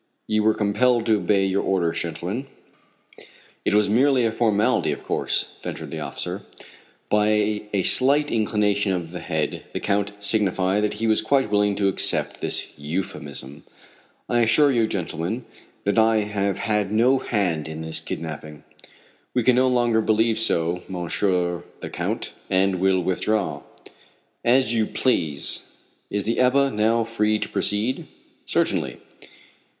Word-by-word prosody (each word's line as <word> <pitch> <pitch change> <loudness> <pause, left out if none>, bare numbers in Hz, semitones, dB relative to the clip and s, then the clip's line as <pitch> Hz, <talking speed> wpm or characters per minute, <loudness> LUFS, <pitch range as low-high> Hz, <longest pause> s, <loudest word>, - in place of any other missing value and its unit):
"You 110 0 +1
were 110 0 +3
compelled 115 +3 +1
to 110 -1 +3
obey 100 +1 +1
your 95 +1 0
orders, 85 -3 0
gentlemen." 90 - -4 1.2
"It - - +1
was 105 0 +4
merely 125 +3 +3
a 115 - +1
formality, 110 -2 +1
of - - -6
course," - - -1
ventured - - -6
the - - -5
officer. - - -5 0.7
By 105 0 +1
a 100 -2 0
slight 145 +7 +4
inclination 105 -2 +1
of 85 -2 -4
the 90 - -6
head 80 -1 -2
the - - -2
Count 100 +1 -1
signified 100 -1 +1
that 105 0 -1
he 110 +2 -3
was 110 -1 +3
quite 135 0 +1
willing 105 -1 +2
to 100 -1 +1
accept 95 - +1
this - - 0
euphemism. 75 -3 -4 0.6
"I 120 - +1
assure 140 +5 +4
you, 115 -3 +2
gentlemen, 95 +5 -4 0.4
that 100 +3 +1
I 110 0 +4
have 100 -2 -2
had 105 -2 -1
no 125 +5 +3
hand 90 -11 -1
in 80 0 -6
this 80 0 -2
kidnapping." 75 -1 -7 0.7
"We 125 - +2
can 125 +1 +4
no 130 +1 +3
longer 120 -3 +2
believe 110 +1 +1
so, 85 -4 +3
Monsieur 90 -1 -1 0.2
the - - -6
Count, - - -3 0.2
and 95 0 +2
will 95 0 +2
withdraw." 95 -4 -1 0.8
"As 120 -1 +3
you 110 -2 +1
please. 80 - +1 0.5
Is 100 -1 -2
the 115 - 0
Ebba 135 +2 +3
now 115 +1 +1
free 110 -1 0
to - - -4
proceed?" 105 +5 -1 0.4
"Certainly." 65 -3 0
105 Hz, 145 wpm, -23 LUFS, 95-115 Hz, 1.2 s, was